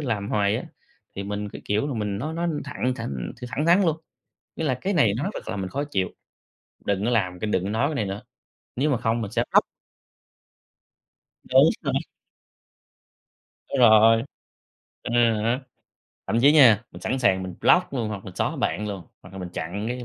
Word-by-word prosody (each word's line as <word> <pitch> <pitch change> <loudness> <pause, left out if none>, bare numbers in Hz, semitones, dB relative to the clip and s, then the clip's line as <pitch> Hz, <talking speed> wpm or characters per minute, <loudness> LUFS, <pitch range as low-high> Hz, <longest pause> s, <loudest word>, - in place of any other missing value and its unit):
làm 110 -8 -2
hoài 100 0 +1
á, - - -5 0.5
thì 100 - -3
mình 105 +1 -4
cứ - - -9
kiểu 105 +6 0
là, 140 - -3
mình 105 -3 -2
nói 155 +6 -4
nói 170 +1 -1 0.2
thẳng 130 -2 -2
thẳng 65 - -5 0.2
thẳng 150 +5 -2
thắn 180 +4 +5
luôn, 160 -3 +2 0.6
nghĩa - - -4
là 130 -4 0
"Cái 200 +1 -1
này 115 - +3
nó 175 +10 -1
thật - - -8
làm 100 - -3
mình 95 - -4
khó 140 +6 -2
chịu, 95 -11 -1 0.8
đừng 100 0 0
có 120 - +1
làm 90 -6 0
cái 110 - -2
đừng 90 - +1
có 95 - -3
nói 115 +7 +1
bên 155 - -3
này 110 - -1
nữa, 95 +1 -5 0.5
nếu 140 +5 +1
mà 135 - +2
không 115 +1 0
mình 100 - -5
sẽ - - +1
block." - - +6 1.8
Đúng - - +5 0.2
rồi. - - -1 1.7
Đúng 135 - -2
rồi. 115 0 +6 0.8
À - - -5 0.3
há. 120 +4 +1 0.7
Thậm 115 - +1
chí 140 +3 +6
nha, 120 -8 +7
mình - - -11
sẵn 130 - -2
sàng 95 -7 +2
mình 95 -1 -6
block 180 -3 +4
luôn 120 -5 -2
hoặc 100 -3 -6
mình 95 - -9
xóa - - -1
bạn 105 +1 -1
luôn, 100 -3 -5 0.2
hoặc 90 - -14
là 95 - -8
mình 90 -1 -5
chặn 90 +4 -5
cái 125 0 -4
110 Hz, 200 wpm, -24 LUFS, 100-135 Hz, 1.8 s, nha